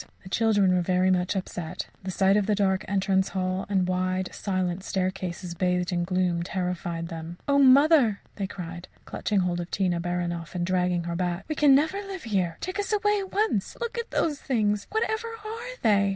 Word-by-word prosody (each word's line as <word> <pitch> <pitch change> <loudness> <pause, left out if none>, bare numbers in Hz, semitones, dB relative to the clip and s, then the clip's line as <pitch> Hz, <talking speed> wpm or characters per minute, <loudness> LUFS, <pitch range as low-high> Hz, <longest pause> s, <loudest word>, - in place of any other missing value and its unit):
The 185 - -10
children 205 -3 +3
were 180 - +3
very 185 +1 +2
much 180 +1 +1
upset. 180 -2 -4 0.2
The 190 - -5
sight 190 +2 +3
of 205 -1 +2
the 210 - +3
dark 190 -2 +1
entrance 190 -1 +1
hall 185 0 -2
and 190 -3 +2
wide, 185 0 -1
silent 185 -2 -2
staircases, 185 -2 -3
bathed 180 0 0
in 175 -1 0
gloom, 180 -1 +1
terrified 175 -2 -3
them. 165 +1 -7
"Oh, 280 0 +4
mother!" 275 -4 +6 0.2
they 195 -2 -2
cried, 175 -2 -7 0.2
clutching 205 -3 0
hold 175 -1 -1
of 175 0 -5
Tina 180 -3 0
Baranoff 175 -1 -3
and 175 -1 0
dragging 180 -1 +1
her 170 0 -3
back, 175 +1 -2
"we 310 - -1
can 290 -3 +5
never 315 +7 +2
live 390 -2 -7
here. 185 -7 -1
Take 370 +3 -4
us 410 - -2
away 415 0 +2
at 385 -1 -6
once. 405 - 0
Look 475 0 -3
at 470 - -4
those 295 -4 0
things. 210 -5 0
Whatever 440 +1 -1 0.2
are 460 +3 -6
they?" 200 -2 +4
190 Hz, 195 wpm, -26 LUFS, 180-225 Hz, 0.2 s, mother